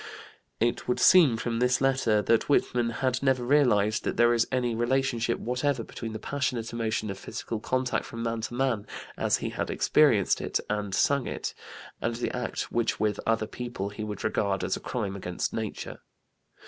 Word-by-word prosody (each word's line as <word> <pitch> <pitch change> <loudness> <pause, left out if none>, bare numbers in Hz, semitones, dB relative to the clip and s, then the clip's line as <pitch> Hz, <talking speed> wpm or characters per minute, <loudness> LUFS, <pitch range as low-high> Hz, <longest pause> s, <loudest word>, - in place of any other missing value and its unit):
It 120 +1 0
would 125 0 0
seem 155 -10 +6
from 115 0 -2
this 125 0 +3
letter 130 -6 +2
that 115 +6 +2
Whitman 120 -4 +2
had 130 +2 -1
never 130 -2 +2
realized 110 -6 +3
that - - -2
there 120 +1 +5
is 115 -1 +2
any 125 -2 0
relationship 120 0 0
whatever 125 +1 -1
between 115 0 -7
the 110 - -4
passionate 125 -2 -2
emotion 110 -2 -1
of 95 - -7
physical 115 - -5
contact 130 +3 -1
from 115 0 -6
man 115 -1 -2
to 120 - -5
man, 125 -5 0 0.3
as - - +1
he - - -4
had - - -3
experienced - - +3
it - - -1
and 105 -2 -2
sung 140 +4 +2
it, - - -4 0.5
and 115 0 -1
the 120 - -3
act 125 -2 -3
which 120 -1 0
with 105 -1 0
other 115 -1 +2
people 115 -3 -5
he 105 +1 -6
would 105 -2 -5
regard 100 -2 0
as 95 - 0
a - - -6
crime 105 -6 -3
against 90 -2 -3
nature. 110 -2 -5
115 Hz, 185 wpm, -27 LUFS, 110-125 Hz, 0.5 s, seem